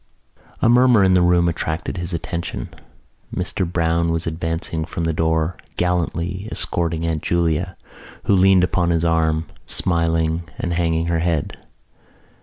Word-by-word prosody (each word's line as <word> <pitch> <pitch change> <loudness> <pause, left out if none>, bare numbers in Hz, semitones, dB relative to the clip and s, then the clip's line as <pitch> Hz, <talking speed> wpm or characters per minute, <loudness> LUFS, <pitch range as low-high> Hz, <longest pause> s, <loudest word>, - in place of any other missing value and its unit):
A - - +5
murmur 120 -3 +5
in 95 -1 +4
the 90 - +4
room 90 0 +3
attracted 80 +2 -3
his 90 0 -4
attention. 85 -6 -4 0.6
Mr 90 -1 -2
Browne 85 -1 +1
was 80 0 -1
advancing 80 0 -3
from 85 +1 -4
the 80 0 0
door, 80 +2 0 0.2
gallantly 90 +2 -1
escorting 85 -1 0
Aunt 80 -2 -1
Julia, 85 +1 0 0.5
who - - +2
leaned 95 -1 +5
upon 90 -1 +1
his 85 0 +1
arm, 80 -1 +1 0.2
smiling 80 -1 +1
and 85 - -2
hanging 85 -1 0
her 85 -1 0
head. 85 -3 -1
85 Hz, 140 wpm, -21 LUFS, 80-90 Hz, 0.6 s, A